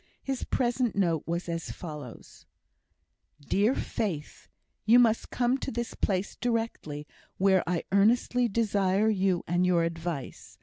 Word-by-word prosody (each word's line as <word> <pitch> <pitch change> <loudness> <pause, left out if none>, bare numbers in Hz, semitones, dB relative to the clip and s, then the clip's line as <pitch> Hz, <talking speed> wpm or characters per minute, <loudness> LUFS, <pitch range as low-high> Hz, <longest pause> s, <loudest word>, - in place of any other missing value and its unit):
His 270 -2 -3
present 245 -2 0
note 170 -6 +1
was 170 +2 -2
as 165 -1 -4
follows: 150 -8 -9 0.9
DEAR 205 - +1
FAITH, 165 -9 -4 0.3
You 225 +4 +6
must 230 -2 +3
come 250 +2 +1
to - - -4
this 235 0 -3
place 190 -1 -1
directly, 225 -11 -3 0.3
where 190 -1 +4
I 175 -2 0
earnestly 235 +4 +3
desire 205 -2 +1
you 190 -3 +1
and 175 +2 +1
your 180 -2 +3
advice. 165 -4 -5
195 Hz, 130 wpm, -28 LUFS, 170-230 Hz, 0.9 s, You